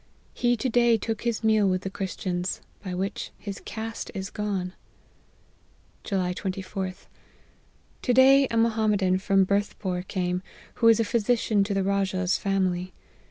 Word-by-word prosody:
He 245 0 +1
to 260 - -1
day 235 -1 +4
took 220 0 -3
his 235 -2 -1
meal 215 -2 +4
with 185 +1 0
the 190 - -3
Christians, 185 -2 -3 0.2
by 185 -3 -4
which 190 +2 -3
his 200 -1 -7
caste 225 +1 -5
is 195 0 -4
gone. 195 -3 -3 0.7
" - - -35
July 185 -3 -1
24/A. 190 0 -5 1.0
To 250 - +1
day 270 +2 +6
a 230 - -1
Mohammedan 215 -5 +2
from 195 0 +3
Berth 200 +2 0
pore 180 -2 -2
came, 180 -1 -2 0.4
who 230 - +6
is 225 0 +6
physician 225 -2 +2
to 200 -1 -2
the 195 - +1
Rajah's 190 -1 +1
family. 185 -2 -1
200 Hz, 150 wpm, -26 LUFS, 185-225 Hz, 1.0 s, day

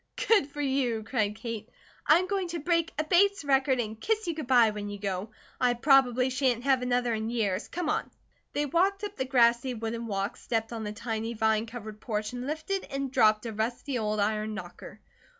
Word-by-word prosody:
"Good 405 -11 +4
for 295 +1 -5
you!" 265 -5 0
cried 215 -3 -1
Kate. 225 -1 -6 0.4
"I 310 - +7
am 365 - 0
going 385 -1 -1
to 340 0 -4
break 335 +1 +1
a 310 - +1
Bates 375 +2 +3
record 270 -1 +3
and 220 -1 -4
kiss 440 0 0
you 340 - -1
good 310 -5 -6
bye, 240 -4 +5
when 205 -1 -5
you 205 - -6
go. 195 0 -3 0.3
I 245 -1 +3
probably 255 -1 +4
shan't 255 -2 +1
have 265 -2 +3
another 245 -1 +1
in 220 0 -2
years. 210 -6 -1
Come 350 -2 -4
on." - - -1 0.4
They 295 - 0
walked 385 +7 +1
up 410 0 -4
the 260 - -2
grassy 245 -1 +3
wooden 230 +1 -4
walk, 200 0 -2
stepped 225 0 -2
on 225 -2 -4
the 210 - -3
tiny, 225 +1 -4
vine 220 0 +1
covered 215 -2 -8
porch, 215 -1 -3
and 250 +1 -5
lifted 320 +6 -2
and 275 -1 -4
dropped 215 -4 +4
a 225 - -4
rusty 240 +4 -2
old 215 -1 -1
iron 215 +1 0
knocker. 215 - -9
245 Hz, 205 wpm, -28 LUFS, 220-285 Hz, 0.4 s, I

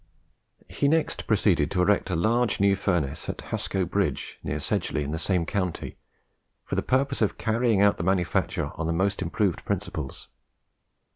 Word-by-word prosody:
He 140 - 0
next 160 +2 +1
proceeded 95 -8 +3
to 90 - 0
erect 100 0 +2
a 90 - 0
large 115 +6 +1
new 100 0 +4
furnace 85 -7 -1
at - - -3
Hasco 95 -1 -1
Bridge, - - -2
near - - -2
Sedgeley, 75 - -1
in 70 - -4
the 80 - -2
same 90 -1 0
county, 90 -1 -3 0.7
for - - -6
the - - +2
purpose 135 +1 0
of 105 - +1
carrying 115 -2 +2
out 100 0 +4
the - - -3
manufacture 90 -1 0
on 80 - -3
the 85 - 0
most 95 +4 0
improved 90 +2 0
principles. 75 -4 -4
95 Hz, 165 wpm, -26 LUFS, 85-110 Hz, 0.7 s, new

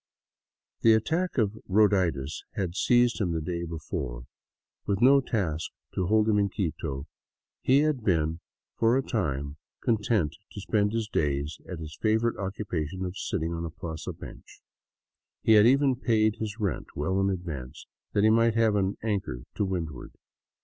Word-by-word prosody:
The 115 -1 +6
attack 165 +11 0
of 110 -2 +1
roaditis 95 -9 +2
had 90 -3 -2
seized 120 +2 +3
him 90 -4 0
the 80 - 0
day 85 +2 -3
before. 75 -7 -5 0.6
With 100 -1 +1
no 135 +4 +6
task 90 - -2 0.2
to 90 - -1
hold 110 +1 +3
him 105 -2 +3
in 100 -1 +2
Quito, 75 -7 -3 0.6
he 135 +2 +4
had 150 -6 0
been 80 -4 +1 0.4
for 115 +2 +4
a 135 - 0
time 70 - -2 0.3
content 105 -8 +1 0.2
to - - -6
spend 105 +1 +1
his 115 -1 -1
days 75 -4 -1
at 90 - -4
his 80 0 -9
favorite 110 +1 +2
occupation 95 -3 -3
of 90 +1 -5
sitting 80 -2 -2
on 85 0 -3
a 85 - -3
plaza 80 -1 -6
bench. - - -12 0.8
He - - +3
had 105 0 +8
even 135 +1 +4
paid 110 -3 +2
his 110 0 -5
rent 100 -4 -2
well 95 +7 0
in 95 - +2
advance, 80 -9 -5 0.3
that 100 - +2
he 110 - +6
might 115 0 +4
have 115 -2 +3
an 100 -1 0
anchor 100 - -2
to - - -1
windward. 85 -8 -4
100 Hz, 165 wpm, -28 LUFS, 80-110 Hz, 0.8 s, had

